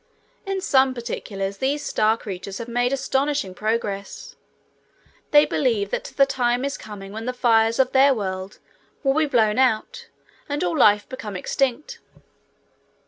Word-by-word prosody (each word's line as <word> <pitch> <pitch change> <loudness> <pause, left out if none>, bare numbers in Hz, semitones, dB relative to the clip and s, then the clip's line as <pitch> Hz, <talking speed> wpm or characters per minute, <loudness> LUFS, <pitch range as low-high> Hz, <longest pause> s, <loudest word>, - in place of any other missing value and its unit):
In 390 -1 -2
some 265 -8 +4
other 260 - -6
particulars, 200 -4 -4
these 285 +3 -1
star 215 +1 +2
creatures 195 -2 -7
have 235 - -6
made 245 +1 0
astonishing 270 -5 -1
progress. 205 -1 -3 0.9
They 295 0 +6
believe 225 -7 0
that - - -2
the 275 - +2
time 250 -1 0
is 280 - -2
coming 200 -2 -9
when 220 +2 -6
the 255 - -1
fires 225 -2 +3
of 265 -1 +2
their 275 +1 +5
world 190 -4 -4 0.5
will 270 -1 +3
be 310 +1 +2
blown 220 -4 +2
out 265 - 0 0.4
and 290 0 -2
all 175 -1 0
life 210 0 +4
become 230 -6 -7
extinct. 270 +8 -2
240 Hz, 150 wpm, -23 LUFS, 210-270 Hz, 0.9 s, They